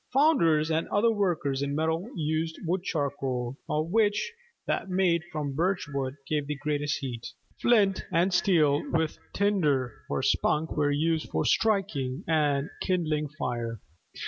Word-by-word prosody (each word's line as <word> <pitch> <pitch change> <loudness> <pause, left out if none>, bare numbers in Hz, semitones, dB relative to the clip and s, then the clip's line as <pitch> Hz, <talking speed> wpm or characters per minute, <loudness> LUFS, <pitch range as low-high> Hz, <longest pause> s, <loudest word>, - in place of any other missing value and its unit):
Founders 170 - +4
and 160 +1 0
other 230 +3 +3
workers 170 -10 0
in 140 0 -1
metal 160 +6 -1
used 160 0 -1
wood 175 +3 0
charcoal, 135 -6 -2
of 155 +2 -1
which 220 - +2 0.3
that - - -1
made 180 -2 +2
from 150 -3 -3
birch 180 +4 0
wood 135 -1 -2
gave 150 -2 -1
the 150 - -2
greatest 145 0 -1
heat. 120 -4 -5 0.3
Flint 205 -5 +3
and 175 +3 +2
steel 155 -6 +3
with 160 -1 0
tinder 150 - +1 0.2
(or - - -1
spunk) 155 +2 +1
were 145 -1 +2
used 160 +2 0
for - - -1
striking 180 - +1
and 150 -3 +1
kindling 155 -5 0
fire. 120 -6 -3
155 Hz, 145 wpm, -28 LUFS, 145-185 Hz, 0.3 s, Founders